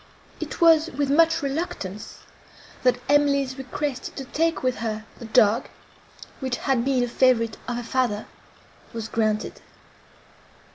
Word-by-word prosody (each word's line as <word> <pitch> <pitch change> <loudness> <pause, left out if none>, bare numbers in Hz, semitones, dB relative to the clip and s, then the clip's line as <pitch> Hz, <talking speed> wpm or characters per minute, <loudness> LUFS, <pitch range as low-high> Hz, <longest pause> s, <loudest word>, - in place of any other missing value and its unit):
It - - -6
was 330 -1 +6
with 280 -1 -1
much 325 +1 +4
reluctance, 245 - -4 0.6
that 250 -1 +3
Emily's 280 -2 +2
request 265 0 -4
to 270 - -6
take 325 +4 0
with 255 -1 0
her 215 0 -4
the 235 - -8
dog, 220 0 +3 0.7
which 260 -3 -2
had 260 -3 0
been 260 -1 +2
a - - 0
favourite 235 -2 +2
of 245 - -2
her 240 - -4
father, 235 -4 -1 0.7
was 225 -1 -4
granted. 215 -1 -1
255 Hz, 135 wpm, -24 LUFS, 230-280 Hz, 0.7 s, was